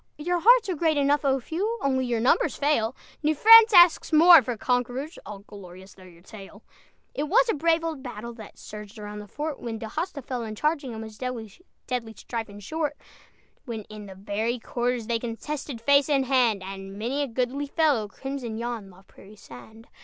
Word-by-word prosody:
Your 350 Hz, +3 st, -1 dB
hearts 470 Hz, +3 st, +5 dB
are 375 Hz, -, -1 dB
great 315 Hz, -1 st, +1 dB
enough, 285 Hz, +1 st, +2 dB
O 270 Hz, -1 st, +2 dB
few: 390 Hz, -, -3 dB
Only 260 Hz, -2 st, 0 dB
your 235 Hz, -2 st, -1 dB
numbers 245 Hz, +4 st, +2 dB
fail, 265 Hz, -5 st, 0 dB, 0.3 s
New 310 Hz, 0 st, +1 dB
France 455 Hz, +6 st, +8 dB
asks 350 Hz, -4 st, +6 dB
more 330 Hz, +1 st, +8 dB
for 240 Hz, -1 st, -4 dB
conquerors, 250 Hz, -, -2 dB
All 210 Hz, -, -7 dB
glorious 190 Hz, -2 st, -13 dB
though 190 Hz, -, -19 dB
your 175 Hz, -2 st, -16 dB
tale. 205 Hz, +1 st, -13 dB, 0.5 s
It 290 Hz, -, -2 dB
was -, -, +4 dB
a -, -, -1 dB
brave 330 Hz, +2 st, +1 dB
old 320 Hz, -4 st, -4 dB
battle 235 Hz, -2 st, -8 dB
That 220 Hz, -2 st, -13 dB
surged 210 Hz, +1 st, -10 dB
around 210 Hz, 0 st, -8 dB
the 210 Hz, -, -10 dB
fort, 295 Hz, +6 st, -5 dB
When 230 Hz, -2 st, -5 dB
D'Hosta 280 Hz, -, -5 dB
fell 245 Hz, -1 st, -4 dB
in 215 Hz, -1 st, -6 dB
charging, 290 Hz, -2 st, -2 dB
And 220 Hz, -, -6 dB, 0.2 s
'twas 245 Hz, -, -6 dB, 0.2 s
deadly 235 Hz, -3 st, -4 dB
strife 225 Hz, -1 st, -6 dB
and 205 Hz, 0 st, -12 dB
short; 305 Hz, +2 st, -3 dB, 0.7 s
When 225 Hz, -4 st, -6 dB
in 210 Hz, -1 st, -9 dB
the 190 Hz, -, -11 dB
very 210 Hz, +5 st, -2 dB
quarters 240 Hz, 0 st, -3 dB
They 230 Hz, 0 st, -1 dB
contested 250 Hz, +3 st, -6 dB
face 280 Hz, +5 st, +3 dB
and 275 Hz, -2 st, +2 dB
hand, 240 Hz, -7 st, +2 dB
And 195 Hz, +1 st, -8 dB
many 245 Hz, +7 st, -2 dB
a 285 Hz, -, -1 dB
goodly 255 Hz, +4 st, -2 dB
fellow 280 Hz, -8 st, +1 dB
Crimsoned 250 Hz, 0 st, -6 dB
yon 230 Hz, -4 st, -5 dB
La 185 Hz, +1 st, -18 dB
Prairie 200 Hz, +1 st, -17 dB
sand. 215 Hz, -, -14 dB
245 Hz, 190 wpm, -25 LUFS, 215-295 Hz, 0.7 s, France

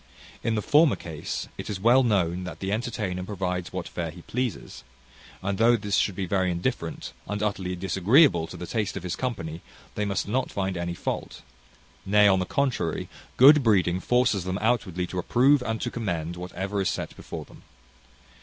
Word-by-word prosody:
In 115 Hz, -, 0 dB
the 105 Hz, -, -1 dB
former 150 Hz, -1 st, +5 dB
case, 80 Hz, -4 st, -5 dB
it -, -, -5 dB
is 100 Hz, -3 st, -3 dB
well 120 Hz, +6 st, +5 dB
known 95 Hz, -7 st, +1 dB
that 90 Hz, -, -7 dB
the 95 Hz, 0 st, -3 dB
entertainer 105 Hz, -5 st, -2 dB
provides 90 Hz, -2 st, -3 dB
what 90 Hz, -2 st, -4 dB
fare 85 Hz, -2 st, -4 dB
he 85 Hz, +2 st, -11 dB
pleases; 125 Hz, -, -4 dB, 0.6 s
and 100 Hz, +1 st, -2 dB
though 120 Hz, +1 st, +6 dB
this 100 Hz, -3 st, -1 dB
should 100 Hz, -, +1 dB
be 95 Hz, -, -2 dB
very 95 Hz, 0 st, +1 dB
indifferent, 85 Hz, 0 st, -3 dB
and 105 Hz, +1 st, -2 dB
utterly 95 Hz, -3 st, -2 dB
disagreeable 95 Hz, -, +4 dB
to 90 Hz, -, -9 dB
the 90 Hz, -, -6 dB
taste 105 Hz, 0 st, -2 dB
of 95 Hz, -, -6 dB
his 90 Hz, -, -3 dB
company, 85 Hz, -11 st, -4 dB, 0.3 s
they 105 Hz, -, -2 dB
must 100 Hz, -1 st, -1 dB
not 125 Hz, +5 st, 0 dB
find 95 Hz, -1 st, -2 dB
any 85 Hz, 0 st, -3 dB
fault; -, -, -4 dB, 0.6 s
nay, 105 Hz, +1 st, +5 dB
on 95 Hz, -1 st, +4 dB
the 95 Hz, -, -1 dB
contrary, 130 Hz, -, -1 dB, 0.3 s
good 145 Hz, +3 st, +8 dB
breeding 95 Hz, -6 st, +3 dB
forces 125 Hz, -4 st, +2 dB
them 95 Hz, +1 st, -2 dB
outwardly 100 Hz, -6 st, 0 dB
to 90 Hz, +1 st, -4 dB
approve 130 Hz, +9 st, +4 dB
and 115 Hz, -2 st, -2 dB
to 120 Hz, -, -2 dB
commend 85 Hz, -7 st, -3 dB
whatever 95 Hz, +3 st, -3 dB
is 95 Hz, -, +1 dB
set -, -, -4 dB
before -, -, -7 dB
them. -, -, -16 dB
100 Hz, 185 wpm, -26 LUFS, 90-115 Hz, 0.6 s, good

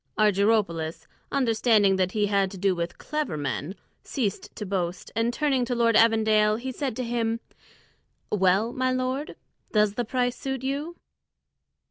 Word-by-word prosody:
Argyropoulos, 200 Hz, -6 st, +1 dB, 0.3 s
understanding 225 Hz, -6 st, +3 dB
that 185 Hz, 0 st, 0 dB
he 210 Hz, -1 st, +2 dB
had 200 Hz, -1 st, +1 dB
to 195 Hz, -, -9 dB
do 195 Hz, +1 st, +2 dB
with 170 Hz, -1 st, -4 dB
clever 300 Hz, -, -3 dB
men, 145 Hz, +5 st, -3 dB, 0.3 s
ceased 215 Hz, -8 st, -3 dB
to 210 Hz, -, -5 dB
boast, 180 Hz, -2 st, -3 dB
and 230 Hz, +2 st, +1 dB
turning 270 Hz, -1 st, +1 dB
to 245 Hz, 0 st, -2 dB
Lord 230 Hz, -1 st, +3 dB
Evandale, 220 Hz, -1 st, +4 dB
he 260 Hz, +2 st, -4 dB
said 265 Hz, -2 st, -3 dB
to 255 Hz, -, -3 dB
him, 230 Hz, -1 st, -1 dB, 0.9 s
"Well, 200 Hz, +3 st, +2 dB
my 255 Hz, 0 st, 0 dB
lord, 255 Hz, +3 st, -2 dB, 0.4 s
does 210 Hz, -2 st, +3 dB
the 240 Hz, -, -1 dB
price 245 Hz, +1 st, -1 dB
suit 265 Hz, -1 st, -4 dB
you?" 285 Hz, +6 st, -3 dB
225 Hz, 150 wpm, -26 LUFS, 195-255 Hz, 0.9 s, Evandale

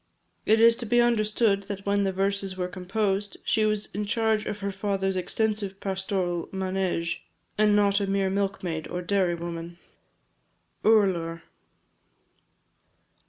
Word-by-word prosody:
It 220 Hz, +1 st, +5 dB
is 230 Hz, 0 st, +7 dB
to 235 Hz, -, -5 dB
be 240 Hz, +2 st, +3 dB
understood 215 Hz, -3 st, +2 dB
that 200 Hz, -1 st, -5 dB
when 200 Hz, 0 st, +2 dB
the 195 Hz, -, +1 dB
verses 195 Hz, 0 st, -1 dB
were 180 Hz, -1 st, -1 dB
composed, 195 Hz, +2 st, -2 dB
she 220 Hz, -1 st, +2 dB
was 215 Hz, -1 st, 0 dB
in 205 Hz, +2 st, -2 dB
charge 220 Hz, 0 st, +1 dB
of 205 Hz, -, -3 dB
her 200 Hz, -1 st, -3 dB
father's 195 Hz, -1 st, -1 dB
extensive 205 Hz, +1 st, -1 dB
pastoral 190 Hz, -3 st, -2 dB
manége, 185 Hz, -3 st, -2 dB, 0.4 s
and 210 Hz, -1 st, +4 dB
not 200 Hz, -1 st, +3 dB
a 200 Hz, -, -1 dB
mere 195 Hz, -1 st, +1 dB
milk 195 Hz, -1 st, -1 dB
maid 160 Hz, -3 st, -3 dB
or 180 Hz, 0 st, -4 dB
dairy 185 Hz, -2 st, +1 dB
woman. 170 Hz, 0 st, -6 dB, 1.1 s
URLAR. 180 Hz, -6 st, +2 dB
195 Hz, 140 wpm, -26 LUFS, 185-210 Hz, 1.1 s, is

